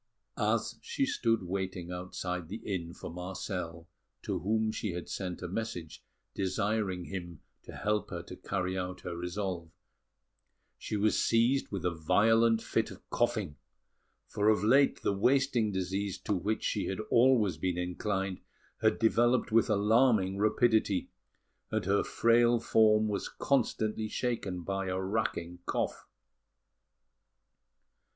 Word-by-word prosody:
As - - 0
she 375 -12 -1
stood 115 - +1
waiting 90 -1 -4
outside 90 -1 -4
the 105 - -4
inn 90 -5 -3
for 85 - -8
Marcel, 90 -2 -5 0.4
to - - -2
whom 110 +4 +1
she 105 -3 -3
had 90 0 -5
sent 90 -2 -5
a - - -3
message 90 -5 -5 0.3
desiring 95 -1 -1
him 85 -4 -7 0.2
to - - -9
help 105 0 -1
her - - -5
to - - -9
carry 95 -1 -2
out 90 0 -4
her 85 - -5
resolve, 90 -1 -4 1.1
she 105 - -3
was 105 +1 +2
seized 120 +4 +2
with 95 -3 -3
a 90 - +1
violent 115 +7 +3
fit - - 0
of - - -13
coughing; 75 - 0 0.7
for 105 +1 +1
of 110 -1 +3
late 135 +6 +4
the - - +2
wasting 125 +1 +2
disease 95 +1 -2
to - - -1
which 100 +4 -1
she 100 - -1
had 95 - -3
always 115 -8 +4
been 90 +2 -1
inclined 95 +1 -2 0.4
had 110 -1 +3
developed 120 +2 +3
with 115 +1 +4
alarming 105 -1 +3
rapidity, 110 -2 +2 0.6
and - - -1
her 100 +2 +2
frail 120 0 +3
form 110 -1 +4
was 100 -2 -2
constantly 110 -5 0
shaken 105 -7 -2
by 95 +1 -2
a 95 0 -1
racking 95 -3 -2
cough. - - -2
100 Hz, 135 wpm, -31 LUFS, 90-110 Hz, 1.1 s, late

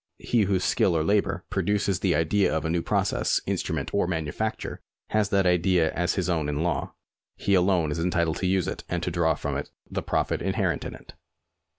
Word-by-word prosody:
He 115 -4 +1
whose 95 -1 +1
skill 85 -4 +2
or 80 - +1
labour 95 0 +1
produces 100 -1 0
the 90 -3 +2
idea 95 +5 +2
of 80 -1 -1
a 80 - 0
'new 85 0 +1
process, - - +1
instrument, - - -2
or 100 -3 +2
manufacture, 85 +6 -3 0.3
has 105 -2 +2
that 95 -1 +2
idea 90 -2 +3
as 90 0 0
his 95 -2 -1
own 80 -5 0
in 75 +2 -1
law. 85 - -2 0.4
He 100 - 0
alone 90 -4 +3
is 80 - -2
entitled 85 -1 +1
to 95 - -1
use 95 -1 +1
it - - -4
and 90 -1 -2
to 90 - -1
draw 80 -2 +2
from 70 -1 -3
it 70 - -5 0.2
the - - -2
profit - - -1
inherent - - 0
in - - -5
it. - - -14
90 Hz, 205 wpm, -26 LUFS, 80-95 Hz, 0.4 s, idea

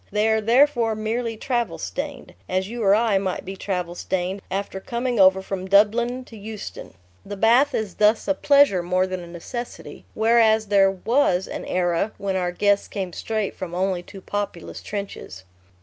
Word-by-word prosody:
They 210 +2 +2
are 220 0 +2
therefore 235 0 +3
merely 225 +1 -2
travel 235 -8 -2
stained, 90 -1 -6 0.2
as 185 +1 0
you 235 +2 -6
or 200 -1 +5
I 220 -3 +2
might 190 -2 -3
be 190 +1 -6
travel 180 -3 -3
stained 185 +2 -3
after 195 0 -3
coming 240 +3 -2
over 190 0 +5
from 190 -1 -5
Dublin 235 +6 +3
to 230 - -13
Euston. 215 - -8 0.3
The 205 0 -7
bath 245 +7 +4
is 215 -4 -2
thus 215 +3 +2
a 290 - +3
pleasure 280 -9 +4
more 180 +1 +1
than 185 0 -4
a 175 - -9
necessity. 205 +8 -8
Whereas 220 -1 +3
there 195 -1 +5
was 195 -1 +1
an - - -6
era, 180 +3 0
when 195 -1 -2
our 180 -1 0
guests 200 +2 +1
came 190 -4 -5
straight 215 0 -3
from 175 -2 -6
only 185 -1 0
too 195 +2 -12
populous 200 -4 -5
trenches.... 200 - -7
200 Hz, 175 wpm, -23 LUFS, 185-225 Hz, 0.3 s, or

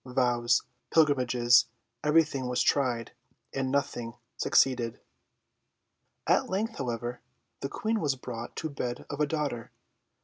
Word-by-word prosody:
Vows, 125 -2 +2 0.3
pilgrimages, 125 -6 +4 0.4
everything 150 -4 +2
was 125 0 +1
tried, 125 -5 +1 0.4
and 130 -1 -1
nothing 120 -4 -1 0.2
succeeded. 120 -3 +2 1.3
At - - +2
length, 215 +4 -2
however, 120 -1 -3 0.4
the 135 - -3
Queen 220 +7 -1
was 145 -7 +1
brought 120 -2 -7
to 160 - -3
bed 125 -3 -4
of 145 - -5
a 150 - +3
daughter. 145 -7 -3
130 Hz, 115 wpm, -29 LUFS, 120-145 Hz, 1.3 s, pilgrimages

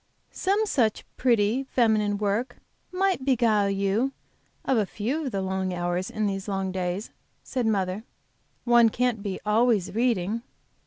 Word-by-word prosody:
"Some 405 +3 +1
such 235 - +1
pretty, 235 +1 +2
feminine 215 -4 +2
work 210 +5 -1 0.3
might 375 -5 +1
beguile 230 -6 +3
you 200 +7 0 0.5
of 265 - +2
a 210 - +1
few 260 +12 -2
of - - -3
the 195 - -2
long 190 -1 -2
hours 175 +1 -2
of - - -14
these 195 -1 -2
long 195 -1 -2
days," 185 +2 -3 0.3
said 250 -3 -2
mother. 195 -1 0 0.6
"One 240 -1 +5
can't 245 -1 0
be 200 -2 -4
always 215 -3 +2
reading." 225 -2 0
215 Hz, 145 wpm, -26 LUFS, 195-245 Hz, 0.6 s, One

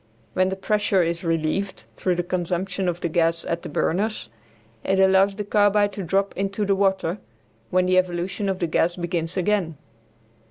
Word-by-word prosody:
When 185 0 +2
the 190 - -2
pressure 205 -1 +1
is 170 +1 -2
relieved 165 +4 -1
through 180 -1 0
the 175 - -1
consumption 180 +2 -2
of 175 0 -4
the - - 0
gas 165 0 +1
at 170 0 -2
the - - -7
burners 190 - -1 0.5
it 190 0 +1
allows 190 +1 +4
the 210 - -3
carbide 205 0 +3
to 200 - -5
drop 195 +3 0
into 195 +1 -1
the 200 - +2
water, 190 -1 0 0.5
when 185 0 +2
the 185 0 +4
evolution 185 +3 -2
of 190 - -1
the 180 - -1
gas 165 +1 +1
begins 175 0 -3
again. 185 -4 0
185 Hz, 175 wpm, -23 LUFS, 170-195 Hz, 0.5 s, allows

